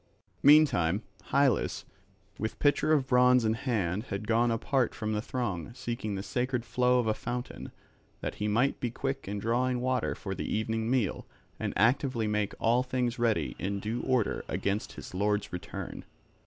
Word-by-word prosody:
Meantime 115 - +5 0.2
Hylas 140 -2 +2 0.6
with 110 - -3
pitcher 145 +1 +2
of 145 -4 +3
bronze 125 -1 +5
in 110 - +3
hand 110 -4 -1
had 100 0 -5
gone 115 +1 +3
apart 120 +2 0
from 110 -2 -3
the 105 - 0
throng, 115 -6 -3
seeking 115 -5 -3
the 95 - -4
sacred 125 +1 -1
flow 125 +1 +2
of 120 - +2
a 110 - +2
fountain, 120 +3 -5 0.5
that - - -3
he 105 - +1
might 120 +6 +2
be 120 - -1
quick 135 +1 -4
in 100 +1 -3
drawing 125 +4 0
water 125 -1 0
for 95 - -5
the 95 - -4
evening 110 +1 -1
meal 125 -7 0 0.3
and - - -1
actively 120 +1 +2
make 105 -1 -1
all 120 +2 +3
things 125 -1 -1
ready 115 -2 +1
in 100 +1 -2
due 110 +4 -3
order 125 -5 0
against 100 +2 -2
his - - -10
lord's 105 +2 0
return. 90 - -6
115 Hz, 170 wpm, -29 LUFS, 105-125 Hz, 0.6 s, Meantime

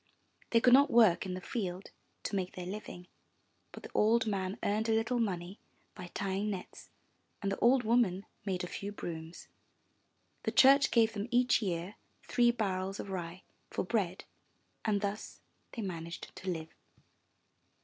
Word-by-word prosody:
They 230 - +5
could 245 +1 +5
not 280 +2 +7
work 215 -6 +5
in 180 - -3
the 185 - -6
field 190 -3 -4 0.3
to - - -2
make 185 -2 -2
their 180 - -5
living; 185 -2 -7 0.7
but - - -11
the - - -9
old 225 +2 +3
man 195 -1 -2
earned 215 +2 0
a - - +4
little 225 +2 +1
money 185 -3 -2 0.3
by 180 - -8
tying 200 +1 -1
nets; 190 -3 -7 0.5
and 195 - -2
the 195 - -3
old 250 +1 +4
woman 220 -5 +2 0.2
made 185 -3 -2
a - - -3
few 200 +3 -5
brooms; 165 -4 -7 0.9
the - - -1
church 275 +1 +6
gave 225 -2 +3
them 205 +1 -3
each 245 +1 +3
year 180 0 -3 0.3
three 245 -1 +3
barrels 195 -4 -1
of 195 - -5
rye 175 -1 -5 0.3
for - - -2
bread, 185 -3 -1 0.6
and 205 -2 +1
thus 205 +1 -4 0.3
they 230 - -4
managed 170 -3 -6
to 185 - -5
live. 160 -2 -4
200 Hz, 160 wpm, -32 LUFS, 180-225 Hz, 0.9 s, not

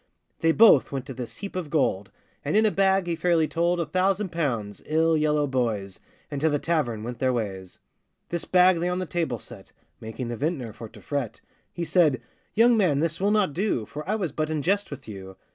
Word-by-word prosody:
They 165 - +3
both 210 - +6
went 135 -2 -4
to 135 - -7
this 120 -2 -7
heap 200 -2 -7
of 180 -5 -4
gold, 105 -11 0 0.3
And 150 +8 +1
in 220 - +4
a 215 - +3
bag 195 -1 +2
he 170 -1 -1
fairly 165 -2 +2
told 170 +2 0
A 170 - 0
thousand 185 +4 0
pounds, 120 -12 -2
ill 160 +1 +2
yellow 150 -1 +2
boys, 115 -8 -2 0.3
And 140 -1 -4
to 160 - +3
the 145 - +1
tavern 140 -8 -1
went 120 +1 -6
their 130 -1 +2
ways. 95 -6 -4 0.5
This 170 -1 -2
bag 180 -1 +4
they 175 +1 0
on 180 - -1
the 185 - -2
table 165 -8 -2
set, - - -12 0.3
Making 115 +2 -6
the 120 - -4
vintner 135 -6 -2
for 115 +1 -9
to - - -15
fret; 140 -6 -4 0.3
He 175 - -4
said, 155 -8 +3 0.4
'Young 235 +2 +5
man! 180 -10 +2
this 165 +2 -1
will 200 - +2
not 210 -7 +2
do, 175 - -1
For 150 +7 -7
I 215 - +2
was 185 -8 -2
but 155 +2 -2
in 155 -2 -2
jest 200 +4 +1
with 140 -3 -9
you. 95 -3 -9
155 Hz, 220 wpm, -25 LUFS, 125-180 Hz, 0.5 s, both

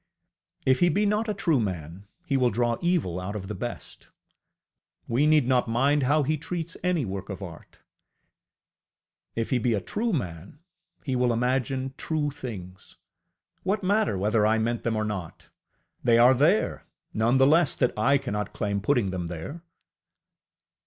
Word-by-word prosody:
If 130 -1 +3
he 175 - +4
be 205 +6 +1
not 210 +2 +1
a - - +1
true 165 -8 +2
man, 90 -2 -4 0.2
he 145 -5 0
will 125 -2 +3
draw 120 +2 0
evil 170 - 0
out 95 +3 -5
of 95 -2 -5
the 105 - -4
best; 120 +2 -7 1.0
we 135 +6 +2
need 150 -5 +4
not 125 -2 +2
mind 140 +6 +2
how 145 +3 +3
he 155 +3 0
treats 165 +2 -5
any 180 -6 +1
work 95 0 -5
of 100 0 -6
art! 85 -3 -11 1.6
If 115 0 -2
he 130 - +2
be 115 -1 +1
a - - 0
true 220 - -2
man, 90 - -4 0.5
he 135 -3 -2
will 125 -1 +2
imagine 130 +2 -1
true 150 -2 -1
things; 95 -9 -9 0.6
what 200 +2 -1
matter 200 - +2
whether 105 +3 +2
I 110 +1 +3
meant 115 +1 -1
them 115 -1 -1
or 110 0 0
not? 95 -6 -6 0.5
They 120 -2 +4
are 120 +2 +7
there 155 - +1 0.3
none 115 +4 +2
the 135 - +5
less 155 +1 +4
that 125 - +1
I 135 +6 +3
cannot 105 -6 -4
claim 100 -1 -2
putting 110 -4 +1
them 90 -2 -3
there! 85 - -7
125 Hz, 165 wpm, -26 LUFS, 105-150 Hz, 1.6 s, are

